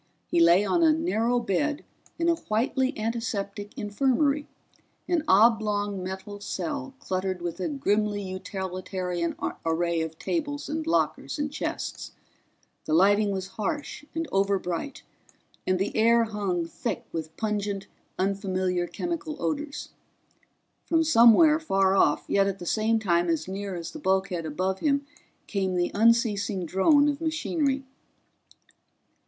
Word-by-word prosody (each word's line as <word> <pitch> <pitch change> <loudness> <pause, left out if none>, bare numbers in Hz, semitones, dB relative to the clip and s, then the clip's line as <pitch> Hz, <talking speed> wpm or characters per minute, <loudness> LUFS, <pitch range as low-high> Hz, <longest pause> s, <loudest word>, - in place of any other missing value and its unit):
He - - +3
lay 170 +4 +6
on 345 - +2
a 325 -2 +6
narrow 245 -7 +1
bed 290 - -1 0.3
in 335 - 0
a 340 - +5
whitely 260 -1 -1
antiseptic 215 -3 -3
infirmary, 275 +6 +1 0.6
an 340 -4 +1
oblong 205 -2 +3
metal 190 +2 -6
cell 275 +5 -4
cluttered 185 -3 -2
with 175 +1 -5
a 185 - -1
grimly 210 -7 0
utilitarian 185 -2 -4 0.3
array 165 0 0
of 160 0 -5
tables 290 - -3
and 315 +1 -3
lockers 330 - 0
and 290 -1 -2
chests. 295 - -4 0.7
The 155 - +1
lighting 205 +4 +4
was 190 -1 -3
harsh 290 +8 -3
and 325 0 -2
overbright 195 +4 -1 0.6
and 185 0 +2
the 195 +2 -2
air 230 +1 +5
hung 200 -6 -2
thick 165 - -4
with 160 -1 -6
pungent 205 -2 -2 0.3
unfamiliar 185 -2 0
chemical 320 - -4
odors. 295 0 -3 0.9
From 325 -1 +2
somewhere, 300 +3 +6
far 195 -10 +2
off 150 -6 +3
yet 195 0 +3
at 195 -1 -2
the 175 - -8
same 220 +5 +2
time 175 -5 +1
as 160 -1 0
near 195 0 -4
as 170 -1 -6
the 310 - -8
bulkhead 190 - 0
above 185 +5 -1
him, 280 -2 +1 0.4
came 190 -3 -1
the 175 0 0
unceasing 215 -4 +2
drone 285 - +4
of 290 0 -1
machinery. 315 -4 0
205 Hz, 135 wpm, -27 LUFS, 185-280 Hz, 0.9 s, lay